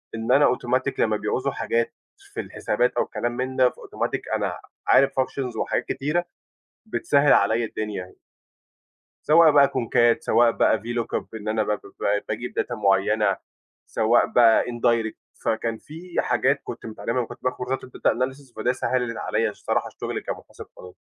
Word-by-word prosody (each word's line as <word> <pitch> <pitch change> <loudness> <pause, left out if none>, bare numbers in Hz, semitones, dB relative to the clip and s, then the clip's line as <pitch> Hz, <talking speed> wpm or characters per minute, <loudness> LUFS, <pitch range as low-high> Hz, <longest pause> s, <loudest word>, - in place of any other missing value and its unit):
إن 115 +2 -2
أنا 140 +3 +6
أوتوماتيك 130 +2 0
لمّا 110 -1 +2
بيعوزوا 130 +6 -1
حاجات 115 -2 -1 0.4
في - - -5
الحسابات 120 +4 -1
أو - - +3
الكلام 120 - -3
من 130 +2 -3
ده 130 -1 +5
فأوتوماتيك - - -4
أنا - - -2 0.3
عارف 135 - +5
functions 130 -2 -2
وحاجات - - -1
كتيرة، 150 +6 -1 0.6
بتسهّل 145 -9 +3
عليّا 110 +3 +3
الدنيا. 105 -4 -5 1.1
سواء 160 +1 +7
بقى 140 -1 +6
كونكات 120 -2 +2
سواء 120 0 +4
بقى 110 - +3
VLOOKUP 120 +2 -3
إن 110 -1 -7
أنا 110 0 +1
ب 105 - -2
ب - - -8 0.4
باجيب 120 +4 -4
data - - -2
معيّنة، 105 0 +2 0.5
سواء 110 +2 +3
بقى 115 -2 +5
indirect 115 -2 0 0.3
فكان 115 0 -1
في 165 +8 -5
حاجات 130 +4 +1
كُنت - - -8
متعلِّمها 115 +1 -4
لمّا 120 -2 0
كُنت - - -12
باخد 130 - 0
كورسات 125 +1 -3
الdata 130 - 0
analysis، 130 +1 -4
فده 110 +3 +1
سهّلت 125 -3 -1
عليّا 110 +1 0
الصراحة 105 - -2
الشُغل - - -5
كمحاسب - - -8
قانوني، 90 0 -12
120 Hz, 155 wpm, -24 LUFS, 110-130 Hz, 1.1 s, سواء